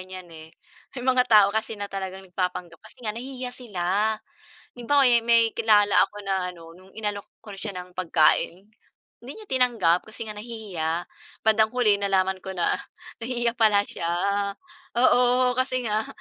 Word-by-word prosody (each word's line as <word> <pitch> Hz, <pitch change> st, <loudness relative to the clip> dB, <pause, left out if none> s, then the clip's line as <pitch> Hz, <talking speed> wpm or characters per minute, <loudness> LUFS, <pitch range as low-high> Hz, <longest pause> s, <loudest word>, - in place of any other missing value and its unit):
ganyan, 185 Hz, 0 st, -9 dB
eh. 160 Hz, 0 st, -11 dB, 0.5 s
May 245 Hz, -, -5 dB
mga 255 Hz, -1 st, +3 dB
tao 210 Hz, -3 st, +7 dB
kasi 220 Hz, 0 st, -2 dB
na 205 Hz, -, -4 dB
talagang 190 Hz, -1 st, -6 dB
nagpapanggap 180 Hz, -2 st, -4 dB
kasi -, -, -16 dB
nga 215 Hz, -, -1 dB
nahihiya 250 Hz, +2 st, -6 dB
sila. 210 Hz, -2 st, -1 dB, 0.6 s
Halimbawa, 275 Hz, +4 st, +2 dB
yung 235 Hz, -2 st, +3 dB
may 230 Hz, -1 st, +4 dB
kilala 210 Hz, -3 st, +3 dB, 0.2 s
ako -, -, -24 dB
na 195 Hz, -1 st, -1 dB
ano, 165 Hz, -2 st, -10 dB
no'ng 185 Hz, +2 st, -18 dB
inalok 210 Hz, -2 st, -4 dB, 0.2 s
ko 210 Hz, -, -10 dB
siya 200 Hz, -2 st, -5 dB
ng 180 Hz, 0 st, -8 dB
pagkain, 180 Hz, +1 st, +1 dB, 0.6 s
hindi 250 Hz, +3 st, -9 dB
niya 430 Hz, -2 st, -12 dB
tinanggap 230 Hz, -10 st, +2 dB
kasi 220 Hz, +1 st, -7 dB
nga 215 Hz, -, -6 dB
nahihiya. 195 Hz, -7 st, -4 dB, 0.4 s
Bandang 220 Hz, 0 st, +4 dB
huli 210 Hz, -5 st, +3 dB
nalaman 190 Hz, -1 st, +1 dB
ko 190 Hz, 0 st, -7 dB
na 175 Hz, -, 0 dB, 0.4 s
nahihiya 240 Hz, 0 st, -1 dB
pala 210 Hz, -2 st, +4 dB
siya, 170 Hz, -, -5 dB, 0.9 s
oo. 250 Hz, +1 st, +4 dB
Kasi 255 Hz, -1 st, 0 dB
nga 215 Hz, +1 st, -1 dB
210 Hz, 160 wpm, -25 LUFS, 185-240 Hz, 0.9 s, tao